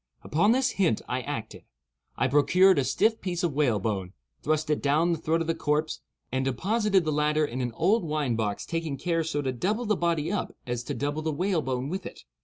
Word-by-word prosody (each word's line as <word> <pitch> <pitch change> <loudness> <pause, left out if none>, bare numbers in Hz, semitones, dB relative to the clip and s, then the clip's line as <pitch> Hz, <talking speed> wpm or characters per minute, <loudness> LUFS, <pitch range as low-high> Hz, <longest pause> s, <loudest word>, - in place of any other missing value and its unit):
Upon 185 +9 +2
this 260 +1 +2
hint 165 - +2
I 125 +1 -1
acted. 120 -5 -6 0.5
I 130 - +2
procured 175 +7 +5
a - - +2
stiff 220 - +1
piece 180 -1 -3
of 170 -4 0
whalebone, 105 -9 0 0.3
thrust 155 0 0
it 150 - 0
down 155 +5 +2
the 165 - -1
throat 165 +1 0
of - - -1
the 165 - 0
corpse, 150 0 -1 0.3
and 130 +1 0
deposited 195 - +1
the 155 - 0
latter 150 +1 +2
in 130 -2 -4
an 120 -1 -2
old 195 - +2
wine 150 -6 -1
box—taking 140 +8 -2
care 165 +3 0
so 150 -2 -2
to 130 - 0
double 210 - -1
the 210 -1 +2
body 170 -2 0
up 205 - -3
as 120 -1 -2
to - - -3
double 145 +2 -2
the 160 0 -1
whalebone 145 -7 -1
with 190 +6 -4
it. - - -11
155 Hz, 205 wpm, -27 LUFS, 135-175 Hz, 0.5 s, procured